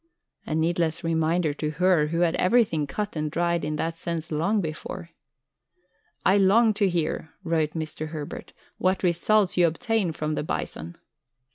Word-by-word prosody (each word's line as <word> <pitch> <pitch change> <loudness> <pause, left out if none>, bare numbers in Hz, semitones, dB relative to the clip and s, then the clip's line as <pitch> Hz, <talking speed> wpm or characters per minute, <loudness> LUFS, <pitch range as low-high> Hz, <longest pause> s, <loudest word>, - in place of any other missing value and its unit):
A 155 - -1
needless 165 +1 0
reminder 165 -1 +1
to 150 +1 -3
her 180 -2 +3
who 165 +2 -1
had 170 -2 +3
everything 180 -8 +2
cut 210 +5 -4
and 155 -1 -1
dried 170 +2 0
in 150 +1 -2
that 165 +2 -2
sense 165 -1 -4
long 170 +8 +1
before! 165 0 -5 1.1
"I 195 - +5
long 215 +3 +5
to 205 -2 +2
hear," 165 -2 -2
wrote 160 -3 0
Mr. 155 -1 -4
Herbert, 155 -2 -7 0.3
"what 185 +1 +1
results 185 +3 +2
you 175 -1 +6
obtain 220 +1 0
from 155 0 -3
the - - -1
Bison." 85 - -5
165 Hz, 155 wpm, -25 LUFS, 155-185 Hz, 1.1 s, you